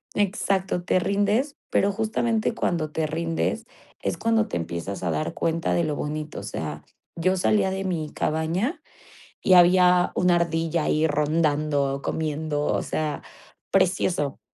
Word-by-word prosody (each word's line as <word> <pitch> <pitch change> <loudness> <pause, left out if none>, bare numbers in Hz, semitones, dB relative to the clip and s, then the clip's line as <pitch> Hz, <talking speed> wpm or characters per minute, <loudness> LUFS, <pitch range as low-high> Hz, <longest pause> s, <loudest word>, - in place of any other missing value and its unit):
exacto, 190 -2 0
te 185 - +2
rindes, 205 +9 +1 0.2
pero 200 - +3
justamente 225 +1 0
cuando 155 -3 -1
te 155 -1 -1
rindes 165 +1 -2 0.4
es - - -2
cuando 225 -1 +1
te - - -2
empiezas 85 +4 -4
a 85 - 0
dar 80 +1 -2
cuenta 165 0 -1
de 170 - +2
lo 150 -1 -1
bonito. 150 +1 -4
O - - -8
sea, 75 -1 -5 0.3
yo 185 +3 +1
salía 190 +1 +2
de 190 0 -3
mi 160 -5 -2
cabaña 165 - -1 0.6
y 185 - +4
había 180 0 +6
una 180 -1 +3
ardilla 165 -1 0
ahí 155 +1 +2
rondando 150 -2 +1
o 140 - -7
comiendo, 155 -1 -2
o - - +1
sea, 155 -2 -3 0.5
precioso, 180 -6 +1
165 Hz, 150 wpm, -25 LUFS, 150-190 Hz, 0.6 s, había